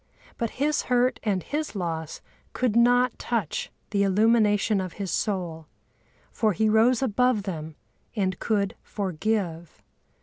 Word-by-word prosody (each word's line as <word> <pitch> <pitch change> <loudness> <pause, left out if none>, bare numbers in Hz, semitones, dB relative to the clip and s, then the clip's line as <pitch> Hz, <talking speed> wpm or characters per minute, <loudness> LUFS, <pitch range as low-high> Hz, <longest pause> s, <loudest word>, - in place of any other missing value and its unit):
But 230 - 0
his 295 +2 +1
hurt 250 -1 +2
and 195 -5 -1
his 300 -4 -3
loss 165 -4 -4 0.3
could 250 -4 0
not 245 +1 +4
touch 225 -9 -2 0.2
the 200 -1 +1
illumination 210 0 +3
of 185 -2 -5
his 195 -3 -4
soul; 175 -6 -2 0.6
for 220 -4 +1
he 220 +4 +1
rose 225 +4 +4
above 250 -2 +2
them 160 -5 -5 0.4
and 190 -4 -1
could 200 -3 0
forgive. 185 -3 -3
210 Hz, 130 wpm, -26 LUFS, 185-235 Hz, 0.6 s, not